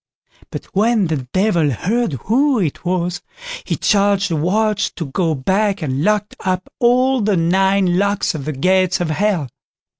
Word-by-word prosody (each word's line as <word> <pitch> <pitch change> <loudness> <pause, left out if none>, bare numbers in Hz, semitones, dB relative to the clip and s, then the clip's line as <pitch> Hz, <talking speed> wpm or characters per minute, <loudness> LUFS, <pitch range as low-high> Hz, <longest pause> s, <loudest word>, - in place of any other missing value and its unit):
But - - -7
when 215 +1 +2
the 150 -6 -3
Devil 185 -6 +2
heard 205 - -1
who 265 +5 +2
it 170 -9 -2
was, 175 -1 -2 0.4
he - - -1
charged 200 -2 +1
the - - +1
watch 210 +6 0
to 165 - -4
go 160 +3 -1
back 190 +7 0
and 135 0 -2
lock 210 +1 +2
up 185 0 -3
all 250 +1 +3
the 205 -2 +1
nine 190 +1 +2
locks 200 0 0
on 145 -4 -6
the 155 - -2
gates 185 +6 +1
of 175 -3 -1
Hell. 185 -3 0
190 Hz, 160 wpm, -18 LUFS, 165-210 Hz, 0.4 s, all